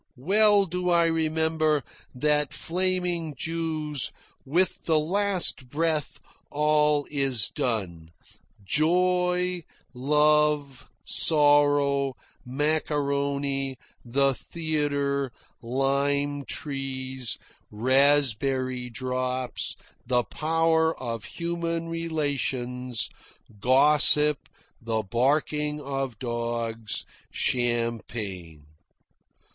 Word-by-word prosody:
Well 205 Hz, +7 st, +4 dB
do 180 Hz, 0 st, -2 dB
I 170 Hz, -1 st, +4 dB
remember 160 Hz, -2 st, +1 dB, 0.3 s
that 150 Hz, +2 st, +1 dB
flaming 180 Hz, -3 st, -1 dB
Jew's 155 Hz, -4 st, -1 dB, 0.3 s
"With 170 Hz, +7 st, 0 dB
the 160 Hz, -2 st, +3 dB
last 180 Hz, -5 st, +1 dB
breath 155 Hz, 0 st, -1 dB, 0.3 s
all 150 Hz, 0 st, +2 dB
is 135 Hz, -6 st, +2 dB
done: 90 Hz, -9 st, -3 dB, 0.6 s
joy, 180 Hz, -, +1 dB, 0.3 s
love, 150 Hz, 0 st, +1 dB, 0.2 s
sorrow, 145 Hz, -3 st, +3 dB, 0.3 s
macaroni, 140 Hz, -1 st, -1 dB, 0.3 s
the 135 Hz, +3 st, +2 dB
theatre, 145 Hz, -3 st, -2 dB, 0.3 s
lime 140 Hz, +3 st, 0 dB
trees, 130 Hz, -2 st, -3 dB, 0.3 s
raspberry 130 Hz, 0 st, +2 dB
drops, 130 Hz, +1 st, -2 dB, 0.3 s
the 125 Hz, -1 st, +2 dB
power 160 Hz, +2 st, +1 dB
of 115 Hz, -3 st, -5 dB
human 170 Hz, -1 st, -3 dB
relations, 135 Hz, -7 st, -2 dB, 0.5 s
gossip, 145 Hz, +4 st, +4 dB, 0.3 s
the 115 Hz, -1 st, -2 dB
barking 150 Hz, +7 st, 0 dB
of 135 Hz, -4 st, -4 dB
dogs, 115 Hz, -2 st, -2 dB, 0.2 s
champagne." 115 Hz, -, -2 dB
145 Hz, 70 wpm, -26 LUFS, 130-160 Hz, 0.6 s, Well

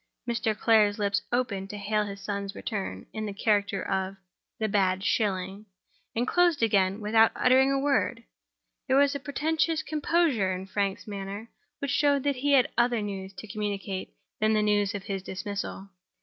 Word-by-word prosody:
Mr. 230 Hz, -2 st, 0 dB
Clare's 210 Hz, -2 st, +4 dB
lips 200 Hz, -1 st, +1 dB
opened 205 Hz, -6 st, -1 dB
to 210 Hz, -, -6 dB
hail 210 Hz, +1 st, 0 dB
his 200 Hz, -1 st, -7 dB
son's 200 Hz, 0 st, -4 dB
return, 190 Hz, -, -4 dB
in 215 Hz, 0 st, -3 dB
the 205 Hz, -, -4 dB
old -, -, -22 dB
character 205 Hz, -3 st, +1 dB
of 190 Hz, 0 st, -2 dB, 0.4 s
the 220 Hz, -2 st, 0 dB
"bad 190 Hz, -2 st, +1 dB
shilling"; 195 Hz, 0 st, -1 dB, 0.5 s
and 240 Hz, +2 st, 0 dB
closed 345 Hz, -6 st, +3 dB
again 195 Hz, -2 st, +2 dB
without 220 Hz, +1 st, +4 dB
uttering 260 Hz, +2 st, +4 dB
a 275 Hz, -, +2 dB
word. 270 Hz, -4 st, +1 dB, 0.6 s
There 265 Hz, 0 st, +3 dB
was 280 Hz, 0 st, +4 dB
a 280 Hz, -, -3 dB
portentous 315 Hz, +3 st, 0 dB
composure 300 Hz, -, +1 dB
in 185 Hz, +1 st, -5 dB
Frank's 195 Hz, 0 st, -2 dB
manner 200 Hz, +2 st, -6 dB, 0.3 s
which 280 Hz, -2 st, -3 dB
showed 285 Hz, -1 st, +3 dB
that 285 Hz, -2 st, 0 dB
he 285 Hz, +2 st, +1 dB
had 260 Hz, -3 st, +5 dB
other 240 Hz, -2 st, +2 dB
news 195 Hz, -2 st, -5 dB
to 190 Hz, +3 st, -9 dB
communicate 200 Hz, -2 st, -4 dB, 0.2 s
than 215 Hz, 0 st, +3 dB
the 215 Hz, -1 st, +2 dB
news 205 Hz, 0 st, +2 dB
of 200 Hz, -, -5 dB
his 195 Hz, -1 st, -3 dB
dismissal. 195 Hz, +1 st, -5 dB
210 Hz, 175 wpm, -27 LUFS, 195-250 Hz, 0.6 s, had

